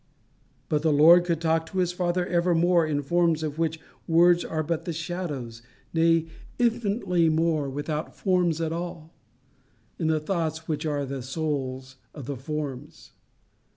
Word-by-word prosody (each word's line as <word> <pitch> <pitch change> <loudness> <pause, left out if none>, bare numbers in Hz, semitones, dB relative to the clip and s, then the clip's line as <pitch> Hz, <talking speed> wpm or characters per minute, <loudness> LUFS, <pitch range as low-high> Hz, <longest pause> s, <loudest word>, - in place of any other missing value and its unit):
But 150 -1 0
the 160 0 +2
Lord 165 +4 +7
could 170 -3 0
talk 160 0 0
to 190 - -7
his 180 -1 +2
Father 180 0 -1
evermore 175 -1 +2
in 150 -2 0
the 145 - -2
forms 165 +1 +1
of 155 0 -4
which 160 -1 -1 0.3
words 175 +1 +5
are 155 -1 -2
but 165 +1 -3
the 170 - -3
shadows, 155 -9 -5 0.3
nay, 165 0 +3 0.3
infinitely 215 -8 +1
more, 160 -3 +1
without 150 +3 -4
forms 180 -4 +1
at 165 0 -1
all, 170 -1 -6 0.9
in 160 - 0
the 160 -1 +2
thoughts 160 -1 -3
which 155 0 -2
are 145 -2 -1
the 135 0 -5
souls 130 -2 -4 0.2
of 145 -5 -8
the 140 +2 -4
forms. 145 0 -6
160 Hz, 155 wpm, -26 LUFS, 150-175 Hz, 0.9 s, Lord